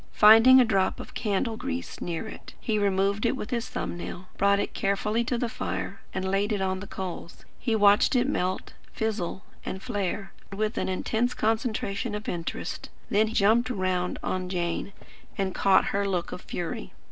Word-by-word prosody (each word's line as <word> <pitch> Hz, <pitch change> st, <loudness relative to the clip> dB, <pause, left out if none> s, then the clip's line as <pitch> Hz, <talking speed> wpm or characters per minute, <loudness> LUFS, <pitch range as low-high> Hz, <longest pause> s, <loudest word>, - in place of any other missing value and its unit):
Finding 225 Hz, +5 st, +8 dB
a 250 Hz, -, +6 dB
drop 195 Hz, -4 st, +1 dB
of -, -, -9 dB
candle 220 Hz, +1 st, -1 dB
grease 260 Hz, +1 st, -5 dB
near 170 Hz, +5 st, -3 dB
it, -, -, -10 dB
he 215 Hz, -2 st, 0 dB
removed 200 Hz, +1 st, +1 dB
it 235 Hz, +2 st, +2 dB
with 225 Hz, -, -6 dB
his 235 Hz, -2 st, -2 dB
thumb -, -, -3 dB
nail; 175 Hz, +1 st, -6 dB
brought 200 Hz, 0 st, +3 dB
it -, -, -2 dB
carefully 210 Hz, +3 st, 0 dB
to 245 Hz, 0 st, 0 dB
the 240 Hz, -, 0 dB
fire, 95 Hz, -, -4 dB
and 190 Hz, 0 st, -3 dB
laid 195 Hz, +3 st, +1 dB
it 205 Hz, -, 0 dB
on 190 Hz, 0 st, 0 dB
the 200 Hz, -, -8 dB
coals. 180 Hz, -3 st, -7 dB
He 230 Hz, -3 st, 0 dB
watched 205 Hz, +5 st, +5 dB
it 250 Hz, +1 st, +3 dB
melt, 185 Hz, -8 st, -1 dB, 0.2 s
fizzle, 210 Hz, -4 st, -2 dB, 0.2 s
and 190 Hz, -, -4 dB
flare, 200 Hz, -3 st, -3 dB, 0.2 s
with 210 Hz, +2 st, -1 dB
an -, -, -1 dB
intense 225 Hz, +6 st, 0 dB
concentration 220 Hz, -1 st, -1 dB
of 210 Hz, +1 st, -6 dB
interest; 170 Hz, -1 st, -4 dB, 0.2 s
then 215 Hz, +2 st, +3 dB
jumped 225 Hz, +4 st, +3 dB
round 185 Hz, -5 st, -1 dB
on 185 Hz, -1 st, -2 dB
Jane, 175 Hz, +1 st, -2 dB, 0.5 s
and 190 Hz, -1 st, -1 dB
caught 195 Hz, -1 st, +4 dB
her 200 Hz, 0 st, +1 dB
look 180 Hz, -3 st, -1 dB
of 180 Hz, -, -6 dB
fury. 165 Hz, -, -5 dB
200 Hz, 180 wpm, -27 LUFS, 185-225 Hz, 0.5 s, Finding